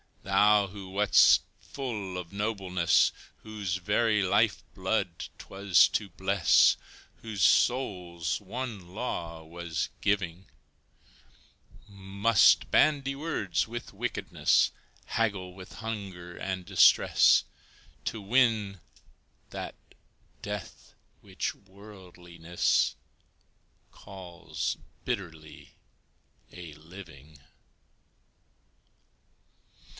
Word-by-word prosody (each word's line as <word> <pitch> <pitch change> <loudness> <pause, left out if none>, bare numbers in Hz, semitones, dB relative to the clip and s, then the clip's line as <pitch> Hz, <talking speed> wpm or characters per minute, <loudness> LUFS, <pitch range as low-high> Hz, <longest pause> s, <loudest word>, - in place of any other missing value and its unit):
Thou, 100 +1 +4
who 95 -1 -10
wast 100 +2 +5 0.2
full 105 -9 -5
of 90 -2 -7
nobleness, 100 -4 +1 0.3
Whose 105 -4 -4
very 105 +3 +1
life 100 +3 +2
blood - - -2
'twas 95 -6 +3
to 105 -3 -2
bless, 95 +1 +3 0.4
Whose 110 -3 -4
soul's 90 -10 +1
one 105 -2 -6
law 85 -9 -4
was 85 0 -4
giving, 95 -3 -1 1.4
Must 100 - +3
bandy 140 -3 +3
words 120 - -2
with 120 +1 -7
wickedness, - - +1 0.3
Haggle 100 -5 -2
with 95 +1 -12
hunger 95 -6 -7
and 95 -1 -4
distress, - - +5 0.6
To 110 - -3
win 105 -3 +1 0.7
that - - -7 0.7
death 105 -3 -7 0.3
which - - -4
worldliness 90 -4 -3 1.0
Calls 90 -5 -6 0.3
bitterly 80 -5 -6 0.8
a 85 -4 -10
living. 80 -2 -14
95 Hz, 80 wpm, -28 LUFS, 90-105 Hz, 1.4 s, wast